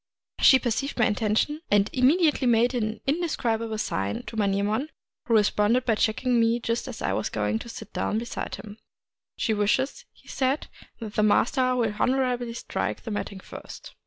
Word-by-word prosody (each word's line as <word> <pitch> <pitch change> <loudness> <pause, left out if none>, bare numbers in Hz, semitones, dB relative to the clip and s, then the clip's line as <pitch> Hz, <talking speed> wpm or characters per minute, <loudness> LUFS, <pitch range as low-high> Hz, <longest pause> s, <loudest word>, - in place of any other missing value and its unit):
She 265 - +7
perceived 260 +3 -2
my 235 - +4
intention, 220 +9 0
and 205 0 +4
immediately 290 +1 +3
made 240 +1 +3
an 220 -3 -2
indescribable 235 -8 -1
sign 100 - -2
to - - -9
Manyemon, 210 +6 0 0.4
who 230 - +3
responded 210 +3 +3
by 230 - +3
checking 235 +3 +1
me 230 +1 +3
just 230 0 -2
as - - -7
I - - 0
was - - -1
going 220 - -1
to 235 - -9
sit - - -9
down 215 - -1
beside 235 +1 -4
him. 210 0 -11 0.3
" - - -68
She 225 - 0
wishes," 250 - 0
he - - -25
said, 265 +2 0 0.2
" - - -29
that 220 -3 -7
the 215 - +1
master 255 +4 +3
will 230 -4 0
honorably 250 -2 0
strike 105 - -3
the 225 - -5
matting 200 -2 -4
first." - - -11
230 Hz, 180 wpm, -26 LUFS, 215-255 Hz, 0.4 s, She